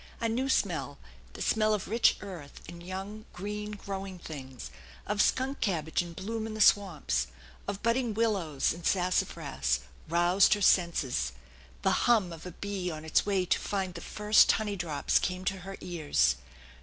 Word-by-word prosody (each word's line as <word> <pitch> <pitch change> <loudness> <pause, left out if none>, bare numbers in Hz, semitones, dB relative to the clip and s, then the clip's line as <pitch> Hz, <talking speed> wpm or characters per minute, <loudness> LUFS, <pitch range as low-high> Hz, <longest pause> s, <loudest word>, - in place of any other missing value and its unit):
A 230 - 0
new 250 +4 -1
smell, - - 0 0.4
the - - -4
smell 215 -1 +3
of 200 - -5
rich 230 +3 +3
earth 175 -8 -9
and 170 +1 -9
young 195 +4 -6
green 210 +3 -5
growing 195 -2 -6
things, 135 -7 -8 0.3
of 210 0 +1
skunk 265 +2 +1
cabbage 160 -7 0
in 175 -1 -7
bloom 220 +5 -4
in 220 - -6
the - - -6
swamps, 165 - +3 0.4
of 200 +1 -4
budding 230 -1 +1
willows 195 -13 +1
and 170 +1 -10
sassafras, 70 - 0 0.3
roused 175 +4 +4
her 205 - -5
senses; 135 - +2 0.5
the - - +2
hum 205 -8 +4
of 165 +2 -9
a - - -6
bee 195 0 -4
on 155 -1 -6
its 160 - +2
way 195 -2 +2
to - - +2
find 190 -3 -2
the 170 - -8
first 210 +3 +4
honey 210 -2 -1
drops 160 -6 +1
came 185 0 -3
to 195 - 0
her 195 +2 -8
ears. 145 - +1
190 Hz, 170 wpm, -30 LUFS, 165-210 Hz, 0.5 s, roused